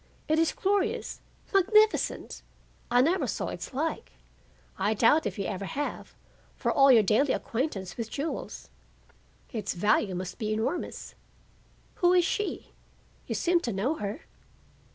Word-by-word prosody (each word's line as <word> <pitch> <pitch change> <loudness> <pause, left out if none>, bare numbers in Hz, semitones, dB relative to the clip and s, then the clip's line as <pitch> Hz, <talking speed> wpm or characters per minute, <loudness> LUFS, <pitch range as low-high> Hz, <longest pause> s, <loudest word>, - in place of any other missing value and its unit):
It 310 +1 +2
is 330 - +3
glorious, 410 +4 -1 0.3
magnificent. 425 +3 +3 0.5
I 245 +1 +5
never 340 +8 +2
saw - - -2
its - - -6
like. 300 +4 -3 0.6
I 215 +1 0
doubt 295 +9 +4
if - - -5
you 195 - -2
ever 195 -1 -3
have, 290 +8 -5 0.4
for - - -1
all 275 -1 +6
your 230 -4 +7
daily 235 +8 +3
acquaintance 225 - -3
with 230 -2 -4
jewels. 300 +6 -5 0.8
Its 210 -6 -3
value 205 0 +2
must 180 +4 -5
be 215 -2 -2
enormous. 225 +11 -3 0.8
Who 355 0 +4
is 355 -2 +4
she? 415 +1 -3 0.6
You - - -2
seem 350 0 +2
to 245 - -3
know 210 +9 0
her." 205 +8 -4
270 Hz, 140 wpm, -28 LUFS, 215-345 Hz, 0.8 s, your